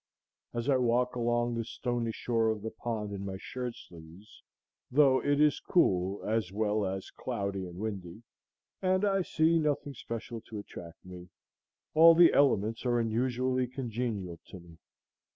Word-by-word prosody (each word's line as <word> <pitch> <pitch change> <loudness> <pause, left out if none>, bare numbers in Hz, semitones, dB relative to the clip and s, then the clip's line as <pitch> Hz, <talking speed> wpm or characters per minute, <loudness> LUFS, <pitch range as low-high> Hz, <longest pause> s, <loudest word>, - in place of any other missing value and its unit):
As 120 +1 -4
I 135 -2 +4
walk 125 0 +1
along 120 0 0
the 115 0 -2
stony 120 0 -3
shore 115 0 0
of 110 -2 -2
the 110 - -4
pond 110 -2 -4
in 100 0 -5
my 95 -1 -5
shirt 125 +4 -5
sleeves, 85 +4 -14 0.5
though 135 -1 +4
it 145 0 +1
is 150 -1 +4
cool 95 - +1
as 110 -4 0
well 105 0 0
as 95 0 -5
cloudy 100 -2 -4
and 85 0 -10
windy, 100 -1 -6 0.6
and 185 +2 +2
I 195 -1 +2
see 165 -1 +2
nothing 145 -2 -1
special 115 -1 -6
to 110 - -6
attract 85 -5 -10
me, 90 -1 -10 0.6
all 165 +1 +8
the 170 0 +7
elements 115 -5 +2
are 120 -1 +1
unusually 125 +2 0
congenial 115 - -4
to 95 - -10
me. 85 -2 -16
115 Hz, 155 wpm, -30 LUFS, 100-130 Hz, 0.6 s, all